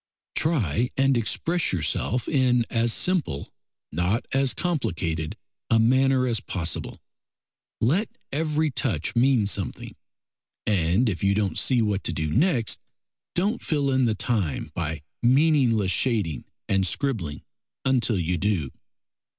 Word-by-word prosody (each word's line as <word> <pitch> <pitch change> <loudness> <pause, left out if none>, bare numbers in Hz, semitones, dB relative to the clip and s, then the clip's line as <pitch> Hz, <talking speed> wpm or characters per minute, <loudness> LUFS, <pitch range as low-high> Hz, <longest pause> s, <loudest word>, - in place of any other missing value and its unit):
Try 125 - +1
and 135 0 +3
express 165 +9 0
yourself 90 +8 -1
in 125 -4 +2
as 115 -1 +2
simple, 170 - 0 0.4
not 90 +9 0
as 135 -1 +2
complicated 85 - -2 0.3
a 115 - +4
manner 130 +3 +3
as 115 -3 0
possible. 85 -6 -3 0.8
Let 170 - +1
every 155 +1 0
touch 80 - -2
mean 120 -2 +4
something, 100 - -3 0.7
and 95 +4 +2
if 95 -4 -2
you 100 0 +3
don't 100 -5 0
see 125 -4 +2
what 105 -2 -1
to 85 - -1
do 80 -1 -2
next, 130 - +1 0.6
don't 205 +7 0
fill 145 -3 0
in 130 -1 +3
the 110 -2 +1
time 100 - -1
by 80 -3 -3 0.2
meaningless 125 - +3
shading 100 - 0 0.2
and 95 -1 +2
scribbling 95 - -2 0.4
until 125 -5 +2
you 90 0 -1
do. 90 -9 0
115 Hz, 125 wpm, -25 LUFS, 90-135 Hz, 0.8 s, a